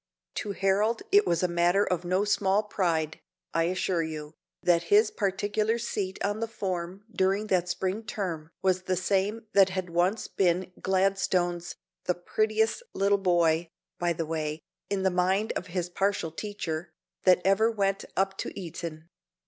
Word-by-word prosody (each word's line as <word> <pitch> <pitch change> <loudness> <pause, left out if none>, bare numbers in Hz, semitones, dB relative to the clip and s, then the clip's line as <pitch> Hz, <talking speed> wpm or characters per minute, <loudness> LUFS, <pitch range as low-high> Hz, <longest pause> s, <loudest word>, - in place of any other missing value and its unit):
To 205 - -3
Harold 200 +4 +1
it 405 +2 +6
was 170 +1 +1
a - - +4
matter 175 +3 +3
of 180 -1 -1
no 185 +3 +1
small 205 0 +2
pride, 165 -7 -1 0.3
I 165 0 +2
assure 180 0 0
you, 155 -1 -5 0.3
that 170 -1 +3
his 210 +1 +5
particular 205 +3 0
seat 200 -5 -3
on 205 +2 -1
the 230 - -1
form 190 -3 -4
during 195 +3 +2
that 180 -1 +2
spring 190 +3 -1
term 180 -8 -4
was 185 -1 +2
the 185 0 -1
same 200 +4 0
that 195 -1 +6
had 185 -2 -3
once 180 +6 +1
been 185 0 +1
Gladstone's 185 -2 +1 0.3
"the 180 - +1
prettiest 215 - 0
little 200 +1 +3
boy," 170 -3 +2 0.3
by 175 0 +1
the 165 0 -3
way, 155 -1 -3 0.3
in 195 -1 -1
the 190 - +3
mind 185 +4 +1
of 185 - -3
his 180 0 -2
partial 190 -2 -1
teacher, 175 -3 -4 0.4
that 185 -1 +6
ever 195 +4 +4
went 195 -3 0
up 195 0 +1
to - - -4
Eton. 165 -2 -6
185 Hz, 160 wpm, -28 LUFS, 175-200 Hz, 0.4 s, it